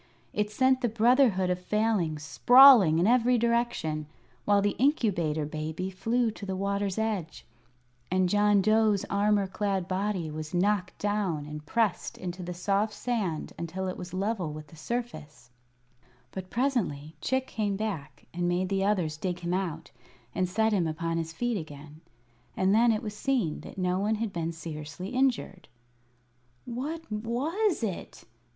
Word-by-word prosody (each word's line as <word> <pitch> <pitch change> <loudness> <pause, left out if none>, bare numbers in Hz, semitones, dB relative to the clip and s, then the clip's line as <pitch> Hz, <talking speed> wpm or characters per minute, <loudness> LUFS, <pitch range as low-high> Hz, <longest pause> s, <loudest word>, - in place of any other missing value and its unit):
It 210 0 0
sent 260 +4 +2
the 240 - +1
Brotherhood 225 -4 +3
of 180 - -1
Failings 180 -6 0
sprawling 245 - +7
in 170 - +3
every 245 +2 +4
direction, 235 -10 0 0.4
while 205 -1 +4
the 205 0 0
Incubator 180 - +1
Baby 155 +5 -4
flew 230 +4 0
to 210 - -12
the 190 -1 -3
water's 200 0 -1
edge, 210 -7 -3 0.6
and 185 0 +2
John 205 +1 +3
Dough's 215 -1 +3
armor 205 0 +2
clad 195 -1 -2
body 185 -4 -2
was 155 +2 -6
knocked 185 0 +1
down 200 -8 -1
and 150 0 -7
pressed 225 -2 0
into 180 0 -6
the 180 0 -5
soft 200 +4 0
sand 210 -12 -2
until 180 +3 -4
it 185 - -3
was 180 0 -8
level 190 -3 -2
with 150 0 -9
the - - -14
surface. 155 - -6 0.8
But 185 -1 -7
presently 195 - -1
Chick 260 +6 0
came 210 -5 -2
back 160 -10 -5
and 175 0 -1
made 180 +1 0
the 195 -1 0
others 180 -7 0
dig 180 +1 -3
him 175 +1 -2
out 170 -4 -3 0.4
and 185 -1 0
set 220 +3 +1
him 180 -5 +2
upon 165 +1 -2
his 165 0 -4
feet 240 +6 -1
again, 150 0 -11 0.6
and 190 +1 +3
then 230 +2 +5
it 220 +2 -1
was 210 -1 -5
seen 240 - 0
that - - -11
no 180 0 0
one 210 +2 +1
had 215 -2 -3
been 165 -1 -2
seriously 160 +1 -7
injured. 250 -7 -1 1.0
"What 275 +7 -4
was 270 - -1
it?" 195 -5 -5
195 Hz, 160 wpm, -28 LUFS, 170-225 Hz, 1.0 s, sprawling